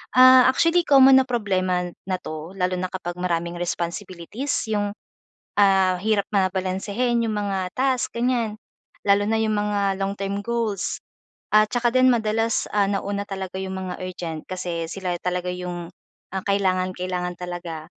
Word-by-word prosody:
Ah, 255 0 +8
actually, 335 +5 +3
common 270 -1 +8
na 265 - +2
problema 185 -7 0 0.2
na 185 - 0
'to 155 +3 -7
lalo 185 -1 0
na 185 - -1
kapag 175 -1 -5
maraming 170 -1 -1
responsibilities 175 - -4 0.2
yung, 205 -1 0 0.7
ah, 190 -2 +4
hirap 210 0 +1
na 195 -2 +3
balansehin 200 +6 -1
'yong 220 - -1
mga 195 -3 -2
task, 260 -1 +1
ganyan. 235 -3 0 0.5
Lalo 200 +1 +4
na 220 0 +1
'yong 220 -1 +1
mga 205 0 0 0.2
long 195 0 -1
term 195 0 -2
goals. 230 -5 -2 0.5
At 215 0 +5
tsaka 240 -1 +2
din 255 0 +6
madalas, 225 0 +1
ah, 200 -1 +3
nauna 200 0 -2
talaga 190 -1 -5
'yong 190 0 -4
mga 185 -1 -4
urgent 170 -3 -5
kasi 175 -3 -3
sila 185 -2 -3
talaga 180 0 -2
'yong, 175 -1 -5 0.5
ah, 190 - -1
kailangang-kailangan 185 -2 -1
talaga. 175 -3 -6
195 Hz, 150 wpm, -23 LUFS, 180-220 Hz, 0.7 s, Ah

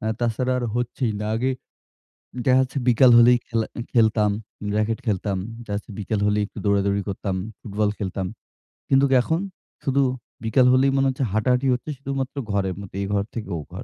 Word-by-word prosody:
অ্যা 110 -2 -1
তাছাড়া 120 +2 0
আর 120 - -2
হচ্ছেই 120 -1 -1
না। 105 - -2
আগে 130 +3 0 1.0
দেখা 130 0 +5
যাচ্ছে 130 +2 -3
বিকাল 125 +1 +6
হলেই 120 +1 +7
খেলা 115 -2 0 0.3
খেলতাম, 110 -3 +3 0.5
র‍্যাকেট 110 +1 0
খেলতাম, 100 -1 0 0.3
জাস্ট 105 0 -3
বিকেল 105 0 -2
হলেই 105 0 +2
একটু - - -12
দৌড়াদৌড়ি 100 0 +2
করতাম, 95 0 -3 0.3
ফুটবল 105 0 -1
খেলতাম। 95 -1 -3 0.6
কিন্তুক 135 0 +4
এখন? 160 +6 0 0.5
শুধু 135 0 +3 0.4
বিকাল 125 +3 +4
হলেই 135 +1 +4
মনে 135 0 +3
হচ্ছে 130 +1 -2
হাঁটা-হাঁটি 125 +5 +2
হচ্ছে 125 +5 -4
শুধুমাত্র 135 0 -4 0.2
ঘরের 95 -2 0
মধ্যে 100 -1 -8
এ - - -2
ঘর 100 -1 +2
থেকে 110 -4 -5
ও - - -4
ঘর। 95 +7 -7
115 Hz, 170 wpm, -23 LUFS, 100-130 Hz, 1.0 s, হলেই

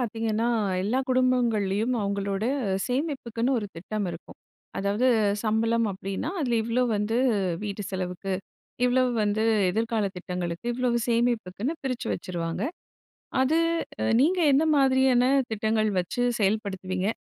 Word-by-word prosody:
பார்த்தீங்கன்னா, 225 -1 -1 0.4
எல்லா 220 +7 0
குடும்பங்கள்லயும் 240 -4 +2
அவங்களோட, 200 +1 -2 0.4
சேமிப்புக்குன்னு 255 -3 -1
ஒரு 210 - -4
திட்டம் 205 +4 -3
இருக்கும். 170 - -10 0.4
அதாவது, 205 +6 +1 0.3
சம்பளம் 225 +1 +1
அப்படின்னா, 195 +7 -4
அதுல 245 -5 +1
இவ்வளவு 240 +2 +1
வந்து, 210 +3 0 0.5
வீட்டு 205 0 -4
செலவுக்கு. 185 0 -3 0.5
இவ்வளவு 250 0 +3
வந்து, 210 +1 +1 0.3
எதிர்கால 225 +2 0
திட்டங்களுக்கு, 180 0 -4
இவ்வளவு 245 -1 +1
சேமிப்புக்குன்னு 235 - 0
பிரிச்சு 255 -3 -3
வச்சுருவாங்க. 170 0 -4 0.8
அது, 300 +5 +2 0.4
அ - - +1 0.2
நீங்க 350 +6 +3
என்ன 280 +4 +4
மாதிரியான 265 -2 +4 0.3
திட்டங்கள் 215 0 +1
வச்சு 180 +7 -3 0.2
செயல்படுத்துவீங்க? 195 -2 -1
220 Hz, 110 wpm, -26 LUFS, 195-250 Hz, 0.8 s, என்ன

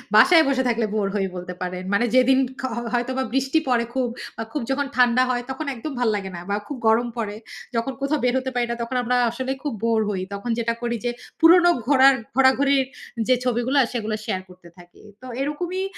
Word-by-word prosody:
বাসায় 325 +8 +7
বসে 260 -1 +1
থাকলে 230 -1 +1
bore 200 -2 0
হই 195 -1 +1
বলতে 180 0 -6
পারেন। 180 0 -4
মানে 235 +4 +3
যেদিন 260 +1 +5 0.2
খ - - -13
হ - - -2
হয়তোবা 260 +2 0
বৃষ্টি 270 +4 +2
পড়ে 235 -1 +2
খুব, 260 -2 0 0.3
আ - - -1
খুব 295 - -2
যখন 285 +1 0
ঠান্ডা 250 0 +4
হয়, 245 -1 -1
তখন 300 +4 -5
একদম 295 +6 -6
ভাল 240 -2 +2
লাগে 195 -1 -4
না 170 - -7
বা 200 - +1
খুব 285 - -5
গরম 230 +2 +3
পড়ে, 210 -2 -3 0.4
যখন 230 +3 -1
কোথাও 285 +2 0
বের 245 - +2
হতে 260 0 -4
পারি 240 -1 +1
না, - - -1
তখন 255 +2 -5
আমরা 250 +1 0 0.2
আসলে 260 +1 -4
খুব 290 - -2
bore 225 -1 +2
হই। 190 -3 -2
তখন 200 +4 -5
যেটা 230 0 0
করি 235 0 -1
যে 240 - +1 0.3
পুরনো 350 +1 +7 0.2
ঘোরার 270 -1 +6 0.2
ঘোরাঘুরির 270 0 +4 0.4
যে 255 - +5
ছবিগুলা, 250 +3 +1
সেগুলো 220 -2 -2
share 185 0 -2
করতে 180 -1 -16
থাকি। 175 0 -17 0.2
তো - - -11 0.2
এরকমই 350 +6 -2
245 Hz, 210 wpm, -23 LUFS, 225-270 Hz, 0.4 s, বাসায়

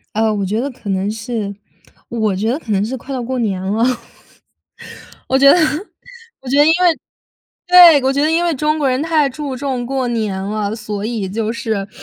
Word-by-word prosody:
呃， 220 0 +2
我 200 -2 -2
觉 215 +4 -1
得 280 +2 -3
可 235 -4 -11
能 195 +2 -1
是 225 -2 -4 0.6
我 215 -5 -1
觉 215 +4 -1
得 260 - 0
可 220 - -10
能 200 0 +1
是 260 +4 -4
快 265 +3 -9
到 255 - -3
过 255 +2 -3
年 195 -5 -1
了。 205 +4 -1 1.5
我 265 - +2
觉 275 +1 +7
得 - - +4 0.8
我 265 - -10
觉 275 - +1
得 290 - +7
因 320 - +4
为 335 -3 +3 0.7
对 350 -5 +8
我 265 - +2
觉 280 +1 0
得 310 - +2
因 340 +2 +1
为 335 -3 +1
中 305 +3 0
国 280 -3 +1
人 255 +3 0
太 315 -3 +2
注 275 0 -5
重 255 -2 -3
过 265 -1 -2
年 215 -5 -2
了。 210 +1 -3
所 210 -2 -5
以 220 -5 -3
就 220 +2 -2
是 215 -4 -3
240 Hz, 225 characters per minute, -17 LUFS, 210-275 Hz, 1.5 s, 对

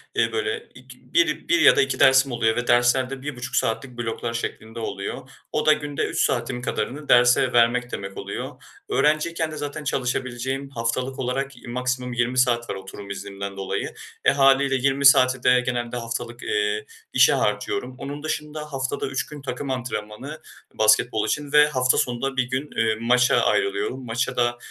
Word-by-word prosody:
eee, - - +2
böyle, 435 +1 -3
ik - - -14 0.2
biri, 340 0 +1
1 340 0 +4
ya - - +7
da - - +4
2 135 0 -1
dersim 135 0 +5
oluyor 115 -2 +1
ve 125 - -2
dersler 120 +2 +3
de 135 -1 -7
1,5 130 -4 -5
saatlik 120 +2 -1
bloklar 115 0 -3
şeklinde 115 -1 -5
oluyor. 110 +4 -5 0.2
O 150 - -1
da 155 - +7
günde 145 -2 -3
3 - - -3
saatim 120 +1 -2
kadarını 135 +6 -4
derse 125 +1 +5
vermek 120 +1 +3
demek 100 0 -6
oluyor. - - -6 0.3
Öğrenciyken 155 +2 +1
de 155 - -7
zaten 145 +1 -5
çalışabileceğim 130 +1 -2
haftalık 125 +1 -3
olarak 135 +2 -2
i - - -11
maksimum 125 0 -2
20 120 +1 0
saat 120 -2 +2
var - - -2
oturum 95 +1 -9
iznimden 100 0 -6
dolayı. 95 - -3 0.3
E, - - +6
hâliyle 135 0 +4
20 135 +2 +1
saati 130 -2 +6
de 125 0 +5
genelde 120 -1 -2
haftalık, 120 0 -5
eee, 435 0 -1 0.3
işe - - +6
harcıyorum. 400 - -1
Onun 145 +2 -7
dışında 150 -1 -5
haftada 135 +1 -2
3 135 0 -2
gün 150 -1 -10
takım 135 +1 -5
antrenmanı 125 +3 -5 0.3
basketbol 110 +1 +3
için 145 -1 -2
ve 150 0 +6
hafta 130 -3 +2
sonu 120 -1 0
da 135 -1 -2
1 130 - +3
gün, 130 +4 -4
eee, 115 - +2
maça 125 +1 +3
ayrılıyorum. 400 - 0
Maça 120 +3 -2
da, 120 0 +1
130 Hz, 175 wpm, -23 LUFS, 120-140 Hz, 0.3 s, ya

